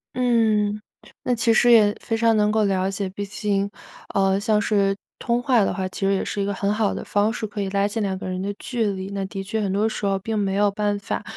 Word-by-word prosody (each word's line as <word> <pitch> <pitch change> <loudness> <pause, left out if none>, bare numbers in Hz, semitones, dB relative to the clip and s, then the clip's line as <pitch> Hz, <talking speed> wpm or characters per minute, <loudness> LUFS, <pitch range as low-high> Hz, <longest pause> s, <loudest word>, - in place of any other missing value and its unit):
嗯， 220 -4 +2 0.4
那 250 - +1
其 230 0 +2
实 240 +2 +5
也 210 -3 +6
非 225 - -2
常 230 0 +3
能 210 0 +3
够 215 0 +2
了 190 -1 +1
解， 195 0 -3
毕 200 +2 -5
竟， 200 0 -1 0.4
呃， 195 0 +2
像 215 0 +2
是 200 -1 +1 0.2
通 235 0 0
话 245 -4 +3
的 - - 0
话， 190 -1 -2
其 - - -9
实 195 - +3
也 195 - -1
是 205 - -3
一 - - 0
个 200 - -1
很 200 +1 0
好 215 -1 +1
的 - - -5
方 205 +2 +1
式， 220 - -4
可 205 -1 -5
以 195 - -2
拉 200 +1 +1
近 220 +2 -3
两 195 -2 -1
个 185 - -6
人 185 0 -3
的 200 +1 -2
距 235 -3 -2
离。 190 0 -5
那 195 -1 -3
的 195 0 -6
确 215 +3 -2
很 195 - -1
多 205 +3 +1
时 215 - -4
候 195 -1 +1
并 220 +3 -3
没 195 -1 0
有 205 0 +3
办 205 0 -1
法 200 - -4
205 Hz, 280 characters per minute, -23 LUFS, 195-220 Hz, 0.4 s, 也